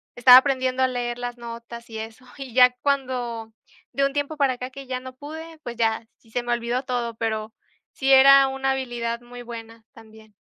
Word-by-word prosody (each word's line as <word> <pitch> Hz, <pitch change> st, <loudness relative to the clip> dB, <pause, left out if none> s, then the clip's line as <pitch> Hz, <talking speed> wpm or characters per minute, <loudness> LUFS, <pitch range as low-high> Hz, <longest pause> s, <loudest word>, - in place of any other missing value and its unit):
estaba 250 Hz, +1 st, +9 dB
aprendiendo 260 Hz, -1 st, +2 dB
a -, -, +4 dB
leer 245 Hz, -1 st, -3 dB
las 245 Hz, 0 st, -5 dB
notas 235 Hz, 0 st, -9 dB
y 225 Hz, -, -7 dB
eso, 225 Hz, +3 st, -9 dB
y 270 Hz, -4 st, -8 dB
ya 250 Hz, 0 st, +6 dB
cuando 250 Hz, -5 st, -2 dB, 0.4 s
de 275 Hz, 0 st, +2 dB
un 275 Hz, -, 0 dB
tiempo 290 Hz, +2 st, -2 dB
para 275 Hz, -3 st, +2 dB
acá 250 Hz, +1 st, -6 dB
que 275 Hz, 0 st, -10 dB
ya 255 Hz, -1 st, -3 dB
no 255 Hz, 0 st, -10 dB
pude, 315 Hz, +3 st, -9 dB
pues 240 Hz, -1 st, -7 dB
ya, 225 Hz, -1 st, 0 dB
sí 225 Hz, -, -26 dB
se 245 Hz, +1 st, -2 dB
me 240 Hz, -, -3 dB
olvidó 240 Hz, +2 st, -2 dB
todo, 240 Hz, -3 st, -3 dB
pero 220 Hz, -1 st, -3 dB, 0.4 s
sí 270 Hz, 0 st, 0 dB
era 275 Hz, 0 st, +8 dB
una 270 Hz, 0 st, -1 dB
habilidad 240 Hz, -3 st, -3 dB
muy 245 Hz, 0 st, -11 dB
buena 230 Hz, -1 st, -10 dB
también. 220 Hz, -2 st, -17 dB
245 Hz, 200 wpm, -24 LUFS, 230-265 Hz, 0.4 s, estaba